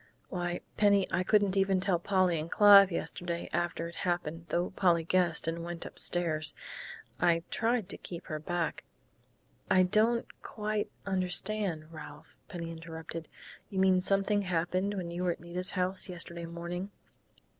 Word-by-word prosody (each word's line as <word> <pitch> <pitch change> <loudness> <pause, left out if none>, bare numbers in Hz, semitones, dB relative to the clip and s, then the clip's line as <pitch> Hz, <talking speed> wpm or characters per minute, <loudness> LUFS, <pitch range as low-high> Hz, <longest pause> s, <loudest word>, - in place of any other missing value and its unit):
Why, 175 -1 -3 0.2
Penny, 200 -2 +4
I 180 +2 +1
wouldn't 205 -3 +4
even 195 -1 +2
tell 185 -2 +1
Polly 185 -2 +2
and 155 +2 -5
Clive 200 -1 +8
yesterday, 170 0 -3
after 170 -1 -1
it 170 - -10
happened, 170 -2 -2
though 175 +3 0
Polly 175 -3 +2
guessed 170 -1 +1
and 165 +1 -2
went 170 0 -5
upstairs. 155 -4 +1 0.6
I 170 0 +3
tried 230 -3 0
to - - -2
keep 170 -2 -8
her 155 -1 -4
back 170 +1 -2 0.4
." - - -38
"I 185 - +5
don't 220 +5 +3 0.2
quite 210 -1 -3 0.2
understand, 185 -3 +1
Ralph," 150 -2 -11
Penny 170 -3 -5
interrupted. 165 0 -8 0.4
"You 195 - -6
mean 190 -1 +4
something 195 +2 +1
happened 185 +2 -1
when 175 -3 -4
you 175 +1 -3
were 180 -1 +2
at - - -15
Nita's 180 +2 -3
house 185 +2 0
yesterday 170 -1 -6
morning?" 170 +3 -5
175 Hz, 155 wpm, -31 LUFS, 170-195 Hz, 0.6 s, Clive